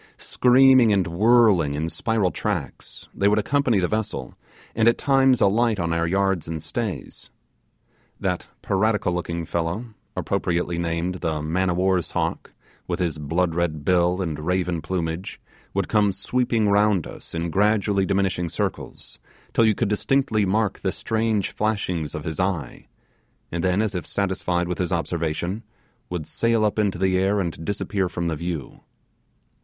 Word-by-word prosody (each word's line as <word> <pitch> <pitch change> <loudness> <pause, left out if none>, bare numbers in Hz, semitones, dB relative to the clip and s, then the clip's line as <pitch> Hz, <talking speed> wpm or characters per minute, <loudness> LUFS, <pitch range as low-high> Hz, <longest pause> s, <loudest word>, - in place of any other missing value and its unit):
Screaming 130 -2 +5
and 95 -3 +2
whirling 95 -4 +4
in 80 +2 -2
spiral 110 0 0
tracks, - - -4
they 100 - +1
would 105 +1 +3
accompany 125 +1 +2
the 90 - +1
vessel, 110 +1 -3 0.4
and 115 0 +2
at 115 - +4
times 135 -3 +3
alight 110 +1 +3
on 85 -1 0
our 85 0 0
yards 95 -2 0
and 80 -1 -5
stays. 105 +6 -5 0.9
That - - -2 0.2
piratical 100 -1 +1
looking 85 -1 -3
fellow, 85 +9 -3 0.2
appropriately 85 -1 -1
named 85 +2 -2
the 80 -3 -2
man 90 +4 0
of 85 - 0
war's 95 -2 +1
hawk, - - -2 0.4
with - - -1
his 80 -4 -2
blood 80 +4 0
red 80 -3 -2
bill 90 +1 +2
and 80 -4 -4
raven 90 +1 -1
plumage, 85 +1 -3 0.4
would 100 -2 0
come 105 -2 +3
sweeping 115 +1 0
round 100 -3 +3
us - - -9
in 85 0 -2
gradually 100 0 +2
diminishing 95 -3 0
circles, - - -5 0.3
till 115 - +4
you 110 -2 +3
could 115 -1 0
distinctly 110 -1 +1
mark 105 +1 0
the 95 - -1
strange 110 -2 -1
flashings 90 -8 -2
of 75 - -5
his 80 -1 -4
eye; 90 -9 -2 0.6
and 85 0 -2
then, 95 +3 +2
as 110 - -2
if 90 - -4
satisfied 90 -3 -1
with 90 - -3
his 90 -2 -1
observation, 85 +3 -2 0.5
would 85 -4 -4
sail 115 +3 +1
up 105 +1 0
into 100 -3 +1
the 95 0 +2
air 100 +2 +2
and 85 -3 -3
disappear 100 0 -1
from 85 0 -3
the 80 - -1
view. 85 -2 -5
95 Hz, 160 wpm, -23 LUFS, 85-105 Hz, 0.9 s, Screaming